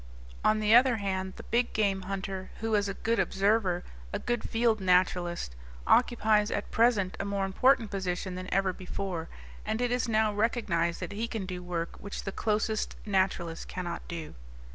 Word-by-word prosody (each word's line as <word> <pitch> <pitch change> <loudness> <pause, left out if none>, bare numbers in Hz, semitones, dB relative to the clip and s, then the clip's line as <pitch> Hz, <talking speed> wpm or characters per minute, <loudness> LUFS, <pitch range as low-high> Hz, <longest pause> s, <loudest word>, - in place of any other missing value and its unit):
On 215 0 +4
the 215 0 +3
other 245 +1 +7
hand, 190 -3 -2
the - - -10
big 240 +1 0
game 200 -3 +1
hunter 190 -1 -4
who 225 0 -2
is 205 -1 +2
a 195 - -4
good 230 +1 0
observer, 195 -3 +2 0.3
a - - -1
good 240 -2 -2
field 225 -1 +2
naturalist, 180 - +1 0.3
occupies 220 -4 +4
at 205 - -3
present 225 -5 +3
a - - -1
more 200 -1 -1
important 230 +3 +3
position 185 -1 -2
than 185 0 -6
ever 195 -1 +2
before, 180 -2 -4 0.3
and 220 +1 -2
it 245 0 0
is 245 -1 0
now 215 -1 +2
recognized 205 -6 0
that - - -4
he 220 +3 -2
can 220 -4 -4
do 180 -1 -5
work 170 -2 -4
which 200 - -6
the 195 - -3
closest 215 +1 -1
naturalist 185 -4 0
cannot 175 -2 -4
do. 165 -3 -6
200 Hz, 175 wpm, -29 LUFS, 185-220 Hz, 0.3 s, other